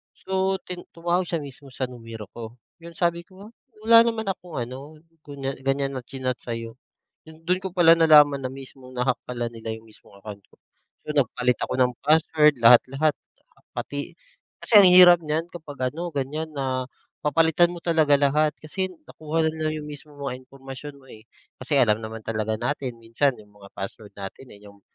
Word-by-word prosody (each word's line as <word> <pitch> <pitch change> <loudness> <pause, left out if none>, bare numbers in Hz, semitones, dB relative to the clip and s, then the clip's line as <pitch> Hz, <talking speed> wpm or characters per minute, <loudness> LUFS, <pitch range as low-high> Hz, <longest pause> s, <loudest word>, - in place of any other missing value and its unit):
So, 190 0 -1
ti 180 -1 -7 0.2
tumawag 175 +2 0
siya 165 -3 -3
mismo 140 0 -11
sa 130 0 -6
numero 115 -3 -9
ko 115 0 -9 0.3
yung 170 0 -12
sabi 170 -1 0
ko 195 +6 -15 0.3
wala 230 0 +8
naman 230 -1 -1
akong 180 -3 -6
ano, 130 +6 -7 0.3
gan'yan 135 -1 -3
na 130 - -4
chinat 130 0 -4
sa'yo 115 -1 -6 0.5
do'n 165 +4 -3
ko 190 - -4
pala 170 -3 +6
nalaman 150 -4 +6
na 130 - -3
mismong 130 -1 -12
na-hack 125 0 +1
pala 120 -1 -3
nila 115 0 -8
yung 110 - -17
mismong 110 -2 -19
account 100 0 -10
ko. - - -26 0.5
So, 150 - -4
nagpalit 125 -3 +1
ako - - -2
ng 125 -1 +3
password 155 -1 +4
lahat-lahat 130 +6 +5 0.6
pati - - -5 0.5
kasi - - -5
ang 190 - +7
hirap 180 -1 +9
niyan 155 +2 -1
kapag 145 -6 -4
ano 170 +3 -4
gan'yan 145 +3 -3
na 130 -2 -2 0.4
papalitan 165 +3 +3
mo - - -8
talaga 160 -4 +2
lahat 150 +2 +2
kasi 185 +5 -4 0.2
nakuha 160 +1 -2
na 155 0 -1
lang - - -3
yung - - -9
mismong 145 0 -12
mga 135 -2 -3
impormasyon 135 +2 -10
mo, - - -20
eh, 110 -1 -14 0.4
kasi 140 +2 0
alam 110 -4 +3
naman 110 0 -7
talaga 110 0 -2
natin 125 0 -3
minsan 115 +5 +1
yung 105 -1 -17
mga 100 - -13
password 100 +2 -7
natin 100 +6 -9
yung, 100 0 -16
140 Hz, 175 wpm, -24 LUFS, 125-160 Hz, 0.6 s, hirap